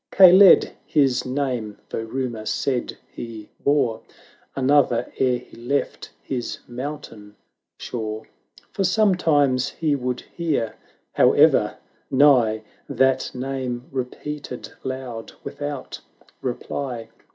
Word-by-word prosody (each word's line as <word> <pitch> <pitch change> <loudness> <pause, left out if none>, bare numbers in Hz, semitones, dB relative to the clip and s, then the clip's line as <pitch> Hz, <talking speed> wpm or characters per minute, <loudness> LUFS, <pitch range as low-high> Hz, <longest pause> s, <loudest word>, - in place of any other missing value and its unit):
Kaled 190 +1 +8
his 135 -4 +2
name, 125 -6 -2
though - - -3
rumour 115 -1 -4
said 130 -3 -1
he 115 -3 -8
bore 135 -6 +1 0.5
Another 135 -3 +2
ere 125 -2 +3
he 125 - -15
left 125 +5 -2
his 125 -3 -4
mountain 120 -5 -7 0.4
shore; 110 -2 -5 0.5
For 195 - -1
sometimes 165 - +3
he 155 -3 -1
would 125 -2 -3
hear, 150 -10 -2 0.4
however - - +4 0.3
nigh. 125 -6 +4 0.3
That 130 0 +2
name 125 -1 -3
repeated 135 +1 -5
loud 130 -3 -6
without 145 -1 -6 0.4
reply. 120 -5 -4
130 Hz, 95 wpm, -23 LUFS, 120-145 Hz, 0.5 s, Kaled